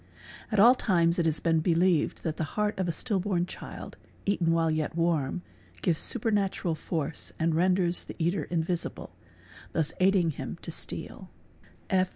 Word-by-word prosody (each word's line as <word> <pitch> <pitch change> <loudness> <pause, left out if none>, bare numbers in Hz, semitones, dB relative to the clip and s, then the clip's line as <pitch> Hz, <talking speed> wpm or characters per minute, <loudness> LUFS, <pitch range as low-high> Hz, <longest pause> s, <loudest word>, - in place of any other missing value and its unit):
At 215 - +2
all 235 +5 +9
times 175 -8 +2
it 165 - +2
as 160 -1 +1
been 165 -1 +2
believed 170 0 +2
that 160 -1 -2
the - - -1
heart 210 -1 0
of 185 - 0
a - - +1
stillborn 190 -2 0
child, - - -9 0.3
eaten 180 -4 +2
while 165 -1 +2
yet 155 0 -1
warm, 165 -1 0 0.4
sives 165 -4 +2
supernatural 200 -5 +1
force 160 -1 -4
and 165 0 +1
renders 180 +1 +2
the - - -9
eater 170 -1 0
invisible, 170 0 -3 0.6
thus 160 -2 0
aiding 185 -3 +4
him - - -6
pisteal. - - -5
170 Hz, 150 wpm, -28 LUFS, 160-190 Hz, 0.6 s, all